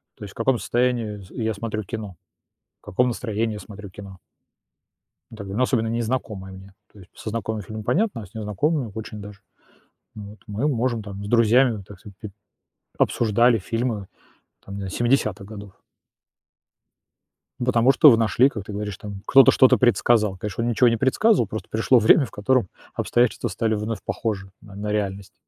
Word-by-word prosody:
то - - -12
есть 100 - -9
в - - -40
каком 120 +2 +2
состоянии 120 -4 -1
с 95 - -14
я 110 -3 -2
смотрю 110 0 -4
кино, 105 -2 -7 0.7
в - - -29
каком 125 +6 +1
настроении 110 -2 -2
смотрю 105 -1 -10
кино. 95 0 -11 1.2
Тогда 100 +3 -4
особенно 120 -3 +1
незнакомое 115 -4 -3
мне, 95 +1 -13 0.2
то 105 - -17
есть 90 - -16
со 110 - -6
знакомыми 110 -1 -3
фильмами 110 +2 -8
понятно, 190 - 0
а - - -9
с 100 - -20
незнакомыми 110 - -1
очень 110 -1 -7
даже 100 -1 -11 0.8
вот. 105 0 -10
Мы 105 +7 -2
можем 120 -4 0
там 100 -1 -8
с - - -6
друзьями, 115 -1 +3
так 100 -3 -13
сказать, 100 -1 -14
пи 105 - -7 0.7
обсуждали 115 +1 +3
фильмы 115 0 -3 0.6
там 100 0 -8
нез 95 -1 -5
70 110 -5 0
годов. 100 -2 -10 1.9
Ну, 120 - -2
потому 125 +1 +4
что 145 +2 +7
вы 115 - +5
нашли, 115 +4 +3
как 105 -8 -7
ты 105 - -8
говоришь, 105 -2 -4
там 100 -2 -8
кто-то 135 0 +7
что-то 130 - +5
предсказал. 110 -4 +2
Конечно, 105 +3 -4
он 120 - 0
ничего 120 +2 +3
не 115 - 0
предсказывал, 135 - +2
просто 110 +1 -6
пришло 115 +3 +3
время, 135 +6 +5
в - - -13
котором 110 0 +1 0.3
обстоятельства 120 -1 +1
стали 110 -1 -1
вновь 105 +1 -3
похожи 100 -4 -3
на 100 -3 -14
на 105 +1 -4
реальность. 100 -2 -3
110 Hz, 170 wpm, -23 LUFS, 100-120 Hz, 1.9 s, что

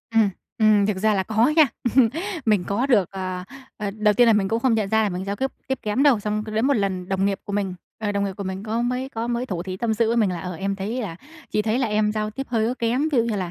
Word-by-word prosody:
Ừm, 215 -3 +5 0.3
ừm, 215 -2 +4
thực 205 -2 -1
ra 215 +2 +2
là 190 -1 +1
có 225 +4 +2
nha. 310 -4 +7 0.8
Mình 205 -5 +3
có 230 +7 0
được 210 -9 +3
ờ, 185 -1 -4 0.3
ờ, 205 -2 -3
đầu 210 0 +2
tiên 245 -1 +5
là 225 - +6
mình 200 -2 +2
cũng 225 +1 0
không 250 -3 +3
nhận 210 -3 0
ra 220 +1 +3
là 210 - +1
mình 185 0 -4
giao 200 +1 -3
tiếp 265 +3 -1 0.2
tiếp 265 -1 -1
kém 215 +6 0
đâu, 265 -8 +5
xong 210 +1 -2
cứ 215 - -7
đến 220 +4 +1
một 280 - +3
lần 190 -3 -1
đồng 190 0 0
nghiệp 200 -1 0
của 205 - -6
mình, 195 -3 -1 0.2
ờ, 210 -2 -2
đồng 200 0 0
nghiệp 195 - -2
của 200 - -5
mình 190 +1 -4
có 225 +2 -1
mới 250 +2 -1
có 230 -3 -4
mới 240 +1 -1
thủ 175 -5 -3
thỉ 185 0 -5
tâm 220 +1 0
sự 225 +1 +2
với 235 - +1
mình 210 -5 +3
là, 175 -2 -4
ờ, 180 0 -5
em 195 +3 -2
thấy 215 +6 -3
là 165 -5 -5 0.3
chị 210 - +1
thấy 220 +3 0
là 255 - +1
em 210 0 +1
giao 215 0 -2
tiếp 270 +5 -6
hơi 225 -2 +1
có 250 - -1
kém. 250 +7 +1
Ví 255 - +3
dụ 230 - +3
như 225 -3 -1
là 180 -3 -3
215 Hz, 305 wpm, -23 LUFS, 195-230 Hz, 0.8 s, nha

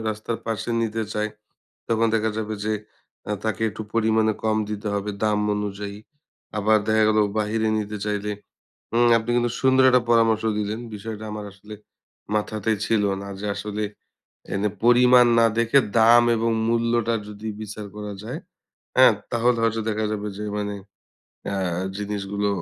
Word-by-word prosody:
রাস্তার 110 +2 -3
পাশে 115 +1 -2
নিতে 110 0 -1
চায় 105 0 -1 0.6
তখন 115 0 +2
দেখা 110 0 +1
যাবে 110 0 -3
যে 110 - 0 0.6
আ - - +1
তাকে 110 0 -1
একটু 110 - -7
পরিমাণে 110 -1 +3
কম 110 0 +2
দিতে 105 0 -4
হবে 100 +1 -2
দাম 105 -1 +2 0.2
অনুযায়ী। 100 0 -4 0.6
আবার 110 +1 +4
দেখা 110 0 +3
গেলো 110 0 +3 0.2
বাহিরে 110 +1 0
নিতে 105 0 -4
চাইলে 105 0 -2 0.6
উম 120 +1 +4
আপনি 110 +2 -4
কিন্তু 120 0 +1
সুন্দর 130 0 +4
একটা 125 -1 +4
পরামর্শ 115 -1 +4 0.2
দিলেন 105 +2 -2
বিষয়টা 110 +1 -6
আমার 105 -1 -5
আসলে 105 +2 -11 0.6
মাথাতেই 110 0 0
ছিল 110 -2 +2 0.2
না 100 - -7
যে 105 - -4
আসলে 105 0 -4 0.7
এনে 100 +2 +1 0.2
পরিমাণ 125 0 +6
না 115 - +6
দেখে 115 +4 +4 0.2
দাম 115 +2 +7
এবং 115 +1 +1 0.2
মূল্যটা 115 0 +1
যদি 105 +1 -7
বিচার 105 0 -7
করা 105 -1 -5
যায় 125 +8 -5 0.6
অ্যা 130 0 +8 0.2
তাহলে 120 0 +2
হয়তো 115 0 +1
দেখা 110 0 -1
যাবে 105 0 -3
যে 105 - -4
মানে 105 0 -2 0.8
আ - - -1 0.4
জিনিসগুলো 100 0 -2
110 Hz, 155 wpm, -23 LUFS, 105-115 Hz, 0.8 s, অ্যা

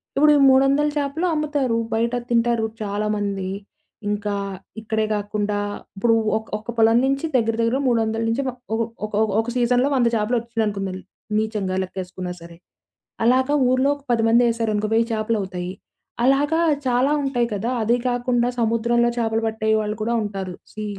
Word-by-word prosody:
ఇప్పుడు 300 +2 +5
ఈ - - +3
300ల 275 +3 +4
చేపలు 290 +4 -1
అమ్ముతారు. 290 -6 0 0.2
బయట 235 +2 0 0.2
తింటారు 235 -1 +2 0.2
చాలామంది. 205 -2 -2 0.6
ఇంకా 205 0 -2 0.5
ఇక్కడే 220 0 -1
కాకుండా 205 0 -2 0.4
ఇప్పుడు 230 +3 +2 0.2
ఒక 220 - -7
ఒక 220 +3 -7
పొలం 225 +1 +5
నుంచి 275 +3 0
దగ్గర 225 -2 +2
దగ్గర 230 +3 +1
300ల 225 -1 +1
నుంచి 230 +5 0
మ 260 - 0 0.2
ఒక 230 - 0 0.2
ఒక 215 - -9 0.3
ఒక 225 - -1
సీజన్‌లో 245 +2 +2
100 245 -3 +3
చాపలొచ్చినయనుకుందాం, 215 -4 -1 0.4
నిజంగా 210 -4 -2
లెక్కేసుకున్నా 185 -1 -6
సరే. 170 0 -12 0.7
అలాగా 260 +4 +3 0.2
ఊర్లో 260 +2 +3
ఒక 285 - -19
10 225 -1 +2
మందేశారనుకో 225 -3 +2
1000 230 +1 +3
చేపలవుతాయి. 195 -5 -2 0.5
అలాగా 290 +5 +3 0.3
చాలా 255 +4 +2
ఉంటాయి 245 -3 +1
కదా! 220 +5 -2
అది 235 +3 +3
కాకుండా 245 0 +1
సముద్రంలో 235 +1 +2
చేపలు 225 -1 0
పట్టే 220 0 -1
వాళ్ళు 210 0 -3
కూడా 235 +2 0
ఉంటారు. 195 -3 -5 0.2
సీ, 215 0 -6
230 Hz, 145 wpm, -22 LUFS, 210-245 Hz, 0.7 s, ఇప్పుడు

